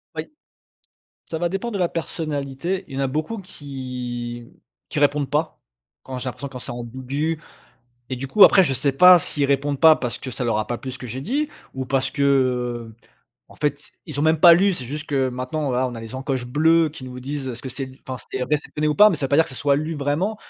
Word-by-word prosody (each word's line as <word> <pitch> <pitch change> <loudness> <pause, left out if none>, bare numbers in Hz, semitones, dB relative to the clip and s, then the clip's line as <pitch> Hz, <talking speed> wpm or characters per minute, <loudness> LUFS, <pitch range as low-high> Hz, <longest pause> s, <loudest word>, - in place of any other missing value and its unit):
Oui. - - -5 1.0
Ça 160 - -2
va 175 +1 0
dépendre 200 +6 -3
de - - -1
la 175 -2 +2
personnalité, 160 +2 -3
y 135 - -7
en - - -1
a 135 - +2
beaucoup 155 +11 -3
qui 125 -8 -6
mmh, - - -22 0.3
qui - - -3
répondent 145 -1 +2
pas, 155 +2 -1 0.4
quand 130 -1 -6
j'ai 125 - -6
l'impression 135 +3 -6
quand 130 -2 -8
c'est - - -8
ambiguë 130 +6 -3 0.7
et 130 - -2
du 135 +2 -5
coup 200 +10 +4
après 190 - +7
je 135 -4 0
sais 135 +2 +1
pas 180 +6 +8
s'ils 145 -3 +1
répondent 140 0 0
pas 160 -1 +8
parce 120 -2 -4
que 130 - -7
ça 125 - -4
leur 115 -2 +1
a 110 - -1
pas 120 - -2
plu 130 - -6
ce 130 - -8
que 125 - -7
j'ai 125 +3 -5
dit, 280 - -1 0.3
ou 130 0 -3
parce 135 0 0
que, 140 - -2
heu, 125 -4 +1 0.5
en - - -16
fait 145 -1 -3
ils 150 -4 -7
ont - - +1
même 160 0 +3
pas 170 0 +10
lu. 195 +3 +3
C'est 130 - -5
juste 150 +5 -6
que 135 -4 +1
maintenant 130 +4 -3
voilà 130 0 +1
on 120 - -7
a 115 - -7
les 115 +2 -9
encoches 130 -2 -3
bleues 160 +5 +3
qui 150 -3 -10
nous 125 0 -8
disent 140 +1 -4
est-ce 120 -1 -7
que 130 - -5
c'est 130 +1 -6 0.2
enfin 130 - -4 0.2
c'est 130 - -2
réceptionné 150 +2 -1
ou 150 - +1
pas, 210 +1 +9
mais 175 - -1
ça 145 - -1
veut - - -11
pas 140 - +3
dire 160 - +6
que - - -10
ce - - -8
soit 140 -1 +2
lu 155 +3 -2
vraiment. 150 +10 -1
140 Hz, 250 wpm, -22 LUFS, 130-155 Hz, 1.0 s, pas